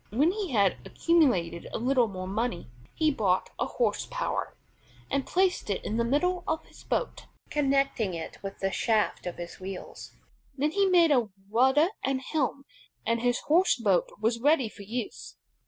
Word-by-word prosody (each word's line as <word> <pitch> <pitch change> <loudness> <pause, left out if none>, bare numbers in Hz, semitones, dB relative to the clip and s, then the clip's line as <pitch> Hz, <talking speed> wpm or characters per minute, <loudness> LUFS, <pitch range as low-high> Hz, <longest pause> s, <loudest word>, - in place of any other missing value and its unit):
When 285 - +3
he 400 -2 -3
had 200 -7 +2
accumulated 240 - +1
a - - -2
little 250 0 +2
more 185 -3 -6
money, 195 - -2 0.2
he 310 -1 +3
bought 195 -8 0
a - - 0
horse - - -1
power, - - -3 0.5
and 275 -1 0
placed 370 - +1
it 200 - -2
in 220 - -1
the 235 - +2
middle 355 +9 +1
of 320 0 -1
his - - -16
boat, - - -2 0.2
connecting 275 -9 +1
it 165 - -7
with 195 0 -6
the 195 0 0
shaft 215 -4 0
of 175 - -4
his 170 0 -8
wheels. 190 0 -8 0.4
Then 295 +3 +1
he 395 +3 +2
made 345 -4 +5
a 245 -6 +3 0.2
rudder 265 +8 +4
and 270 -1 0
helm, 275 0 -2 0.4
and 230 0 +1
his 245 0 +1
horse 350 +5 +4
boat 200 -7 +2
was 225 +2 0
ready 280 -4 +3
for 210 - -13
use. 225 +3 -6
250 Hz, 170 wpm, -28 LUFS, 205-305 Hz, 0.5 s, made